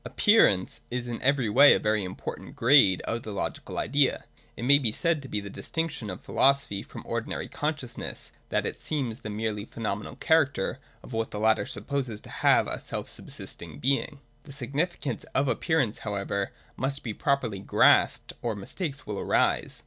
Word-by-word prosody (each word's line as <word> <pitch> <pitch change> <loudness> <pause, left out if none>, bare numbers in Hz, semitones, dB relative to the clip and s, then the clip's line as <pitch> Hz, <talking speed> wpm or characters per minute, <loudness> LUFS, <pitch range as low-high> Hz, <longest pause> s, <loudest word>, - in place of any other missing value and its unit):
Appearance 155 - +3
is 125 0 -3
in 120 -1 -4
every 135 -2 +2
way 140 +7 +7
a - - +1
very 105 -1 +1
important 90 0 -7
grade 115 -7 +5
of 115 +1 -2
the 110 - -7
logical 100 - -4
idea. 140 +2 +1 0.3
It - - -5
may 140 +2 +7
be 120 -6 +1
said 165 +5 +1
to 135 - -9
be 105 - -2
the 100 0 -8
distinction 165 - -3
of 90 - -7
philo 135 - +5
sophy 105 -8 -5
from - - -10
ordinary - - -3
consciousness 145 -6 -4 0.2
that - - 0
it - - -4
sees 130 -7 -2
the 110 - -7
merely 105 -1 -2
phenomenal 105 -2 -4
character 140 - +2 0.2
of - - -11
what 115 0 -1
the 105 - -5
latter 110 +3 +3
supposes 130 -3 -3
to - - -12
have - - +4
a - - -3
self - - -5
subsistent 80 -4 -9
being. 140 - 0 0.3
The 140 - -10
significance 140 0 -2
of 140 +1 +2
appearance 135 -5 +1
how 105 -1 -4
ever 100 0 -2 0.2
must 135 +2 -2
be 115 - -3
properly 125 -6 0
grasped, 95 - +3
or 115 -3 -1
mistakes 140 - -4
will 105 -2 -4
arise. - - +1
120 Hz, 180 wpm, -27 LUFS, 105-140 Hz, 0.3 s, way